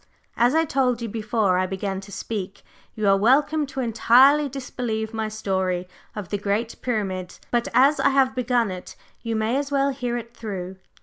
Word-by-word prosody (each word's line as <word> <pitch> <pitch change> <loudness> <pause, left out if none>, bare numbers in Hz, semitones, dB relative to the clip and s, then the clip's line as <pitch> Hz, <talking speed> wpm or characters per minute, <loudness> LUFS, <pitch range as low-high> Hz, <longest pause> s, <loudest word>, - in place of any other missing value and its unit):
As 245 +5 +3
I 325 0 +3
told 260 -6 +1
you - - -2
before 210 -3 0
I 185 - 0
began 190 0 -3
to 200 +1 -12
speak, 195 -1 -5 0.3
you 215 -2 -1
are 195 - +6
welcome 285 +8 +3
to 270 -1 -4
entirely 260 +5 +5
disbelieve 240 -4 -4
my 220 -1 -2
story 190 -4 -2 0.3
of 205 -5 -6
the 205 - -2
Great 210 +3 -1
Pyramid, 195 -7 -3
but 240 -1 +1
as 275 +4 +4
I - - +4
have 265 -1 +3
begun 245 -4 +1
it, 180 -1 -8 0.3
you 230 -1 -3
may 220 +4 0
as 285 0 -2
well 275 0 +2
hear 250 -3 -3
it 235 0 -8
through." 190 -4 -6
230 Hz, 185 wpm, -24 LUFS, 200-260 Hz, 0.3 s, are